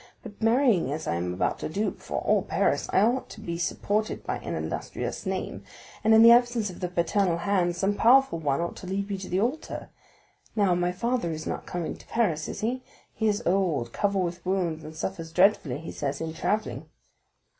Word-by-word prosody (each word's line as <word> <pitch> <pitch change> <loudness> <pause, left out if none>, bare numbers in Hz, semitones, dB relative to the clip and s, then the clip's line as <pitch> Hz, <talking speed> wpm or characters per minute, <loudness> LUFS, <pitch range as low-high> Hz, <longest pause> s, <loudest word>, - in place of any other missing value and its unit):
But 205 - -11
marrying, 225 - +3
as 155 +2 -3
I - - 0
am 90 +1 -2
about 90 - -1
to - - -4
do, 205 +7 0
before - - -5
all - - +3
Paris, - - 0
I - - +4
ought 240 +5 +1
to - - -10
be 170 -5 -4
supported 210 +5 -1
by - - -2
an - - -4
illustrious - - -4
name, - - -3 0.4
and 220 - +4
in 220 - +8
the 230 - +10
absence 240 -4 +4
of 175 - -11
the 180 - -1
paternal 175 +1 +1
hand 175 -1 +1
some 195 +3 +1
powerful 240 -3 +4
one 145 0 0
ought 170 - -3
to 185 - -9
lead 200 +2 -2
me 195 - -1
to 190 - -7
the 185 - +1
altar; 255 +9 -2 0.7
now, 200 -4 +3
my 175 0 +1
father 230 +1 -1
is 155 0 -5
not - - -4
coming 175 -2 -3
to - - -17
Paris, 175 -10 0
is - - -6
he?" 245 +4 -1 0.3
"He 220 - 0
is 210 +2 0
old, 175 -9 +1
covered 200 -2 +1
with 175 0 -4
wounds, 180 -4 -1
and 155 +1 -9
suffers 165 0 -4
dreadfully, 180 -7 +3
he 165 +2 -7
says, 140 -1 -3
in 160 -1 -4
travelling." 215 +6 -2
190 Hz, 210 wpm, -27 LUFS, 165-215 Hz, 0.7 s, the